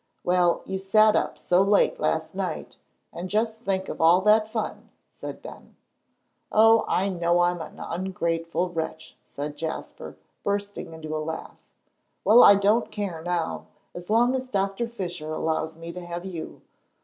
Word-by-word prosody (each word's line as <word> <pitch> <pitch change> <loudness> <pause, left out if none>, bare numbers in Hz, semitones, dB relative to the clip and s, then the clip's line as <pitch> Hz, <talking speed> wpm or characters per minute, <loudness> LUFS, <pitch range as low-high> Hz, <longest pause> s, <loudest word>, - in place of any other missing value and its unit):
"Well, 175 -1 +2
you 190 0 -3
sat 215 +3 +4
up - - 0
so 180 +1 +2
late 205 - +3
last - - -1
night; - - -4 0.4
and 180 +2 -6
just 220 +2 0
think 190 -4 -2
of - - -5
all 170 +3 +6
that 215 +2 +4
fun!" 220 -1 -4 0.2
said - - -8
Ben. - - -12 0.8
"Oh, 225 +1 +5
I 190 - +1
know 175 -1 +1
I'm 175 -1 +1
an - - -9
ungrateful 170 -1 -2
wretch," 160 -1 -5
said 145 +1 -6
Jasper, 160 +1 -6 0.3
bursting 200 -4 -3
into 155 -1 -6
a - - -1
laugh. 160 +1 -7 0.6
"Well, 230 +4 +7
I 200 - +9
don't 205 +4 +2
care 195 -6 -4
now, 175 -1 -2 0.3
as 175 +1 -9
long 240 +3 +4
as 260 -1 -3
Doctor 195 +2 -1
Fisher 175 -8 -5
allows 160 0 -2
me 165 +1 -7
to 180 0 -7
have 175 +1 -6
you. 175 -4 -7
180 Hz, 160 wpm, -25 LUFS, 165-210 Hz, 0.8 s, I